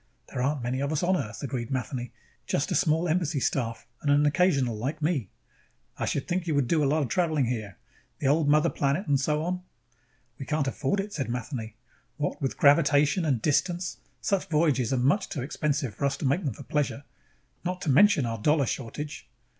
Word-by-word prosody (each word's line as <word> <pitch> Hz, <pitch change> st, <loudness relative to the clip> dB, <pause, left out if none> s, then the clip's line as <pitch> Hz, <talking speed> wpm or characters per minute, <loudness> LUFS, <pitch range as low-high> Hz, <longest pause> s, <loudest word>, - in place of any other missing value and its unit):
"There 125 Hz, -, -3 dB
aren't 140 Hz, 0 st, 0 dB
many 125 Hz, +2 st, -1 dB
of 140 Hz, +2 st, -1 dB
us 155 Hz, +2 st, 0 dB
on 185 Hz, +2 st, +3 dB
Earth," 110 Hz, -9 st, -4 dB
agreed 125 Hz, -4 st, -3 dB
Matheny. 125 Hz, -2 st, -3 dB, 0.4 s
"Just -, -, 0 dB
a -, -, +1 dB
small 160 Hz, +3 st, +2 dB
embassy 160 Hz, -3 st, 0 dB
staff 115 Hz, -3 st, -1 dB, 0.2 s
and 145 Hz, -, -1 dB
an 145 Hz, +1 st, +4 dB
occasional 145 Hz, -7 st, +2 dB
like 135 Hz, +9 st, -3 dB
me." 150 Hz, -, 0 dB, 0.7 s
"I -, -, -2 dB
should 140 Hz, -, -2 dB
think 180 Hz, 0 st, -1 dB
you 155 Hz, -, +1 dB
would 140 Hz, -3 st, +2 dB
do 155 Hz, +1 st, +2 dB
a 140 Hz, -, +2 dB
lot 155 Hz, +1 st, +2 dB
of -, -, -2 dB
traveling 160 Hz, -7 st, +1 dB
here. 110 Hz, -5 st, -4 dB, 0.4 s
The -, -, -5 dB
old 145 Hz, +2 st, +3 dB
mother 150 Hz, +3 st, +4 dB
planet 140 Hz, +8 st, 0 dB
and 140 Hz, -4 st, +2 dB
so 150 Hz, +2 st, 0 dB
on." 180 Hz, +2 st, -2 dB, 0.8 s
"We 135 Hz, -, -6 dB
can't 150 Hz, -2 st, 0 dB
afford 135 Hz, +8 st, -1 dB
it," 200 Hz, +1 st, -3 dB
said 135 Hz, -, -3 dB
Matheny. 120 Hz, -2 st, -4 dB, 0.4 s
"What 150 Hz, 0 st, -2 dB
with 135 Hz, -, -2 dB
gravitation 145 Hz, +3 st, +4 dB
and 130 Hz, -7 st, 0 dB
distance, 175 Hz, +4 st, 0 dB, 0.2 s
such 195 Hz, -2 st, 0 dB
voyages 150 Hz, -6 st, +2 dB
are 130 Hz, -, +2 dB
much 145 Hz, +11 st, +2 dB
too 140 Hz, -, -3 dB
expensive 140 Hz, -3 st, -1 dB
for 140 Hz, -, -2 dB
us 140 Hz, 0 st, 0 dB
to -, -, -4 dB
make 140 Hz, +7 st, +1 dB
them 130 Hz, -7 st, -2 dB
for -, -, -10 dB
pleasure. 145 Hz, -1 st, -1 dB, 0.6 s
Not 180 Hz, +1 st, -2 dB
to 160 Hz, -7 st, +1 dB
mention 190 Hz, -1 st, +5 dB
our 115 Hz, -1 st, -3 dB
dollar 150 Hz, +4 st, +3 dB
shortage." 140 Hz, +5 st, -5 dB
145 Hz, 205 wpm, -27 LUFS, 130-160 Hz, 0.8 s, mention